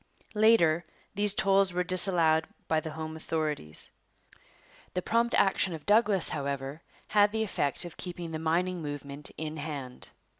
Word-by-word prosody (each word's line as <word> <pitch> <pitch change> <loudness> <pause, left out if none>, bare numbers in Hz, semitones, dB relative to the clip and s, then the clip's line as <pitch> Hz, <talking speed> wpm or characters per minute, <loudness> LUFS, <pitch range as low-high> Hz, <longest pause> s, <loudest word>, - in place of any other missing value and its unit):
Later 210 -7 +4 0.3
these 205 0 +2
tolls 195 -1 +3
were 180 0 0
disallowed 170 -3 +3 0.2
by 160 - +2
the 160 - -6
home 160 0 -6
authorities. 155 - -3 1.0
The 180 - -1
prompt 235 +1 +1
action 190 -2 +2
of 155 - -11
Douglas, 205 -4 +4
however, 140 +1 -4 0.3
had 205 -1 +4
the 220 0 0
effect 145 -8 -1
of 175 - -9
keeping 175 -2 -6
the 160 - -4
mining 175 +3 0
movement 145 -1 -5
in 155 0 -5
hand. 140 -4 -6
165 Hz, 145 wpm, -29 LUFS, 155-195 Hz, 1.0 s, Later